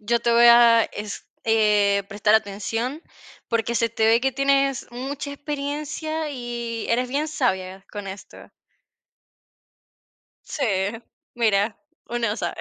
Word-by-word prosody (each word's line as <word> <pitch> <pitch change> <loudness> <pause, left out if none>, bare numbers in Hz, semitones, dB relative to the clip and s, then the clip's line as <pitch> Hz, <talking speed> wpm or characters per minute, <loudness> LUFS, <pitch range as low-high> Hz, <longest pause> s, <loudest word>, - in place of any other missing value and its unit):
Yo 235 +3 0
te 235 0 +1
voy 235 +1 +6
a 235 -1 +7
es 210 0 -7 0.2
eh, 210 -3 +3
prestar 210 +1 +2
atención, 225 - -1 0.5
porque 230 0 -1
se 230 0 +2
te 225 0 0
ve 225 +1 +5
que 265 +1 0
tienes 275 0 +1
mucha 270 +4 -5
experiencia 300 +2 -4
y 240 -3 -5
eres 250 +2 +1
bien 290 +4 -1
sabia 190 -9 -2
con 205 -1 -7
esto. 190 +1 -11 2.0
Sí, 290 - -3 0.7
mira, 215 -2 +1 0.3
uno 235 -1 -1
no 210 - -2
sabe. 175 -6 -3
235 Hz, 130 wpm, -23 LUFS, 210-275 Hz, 2.0 s, a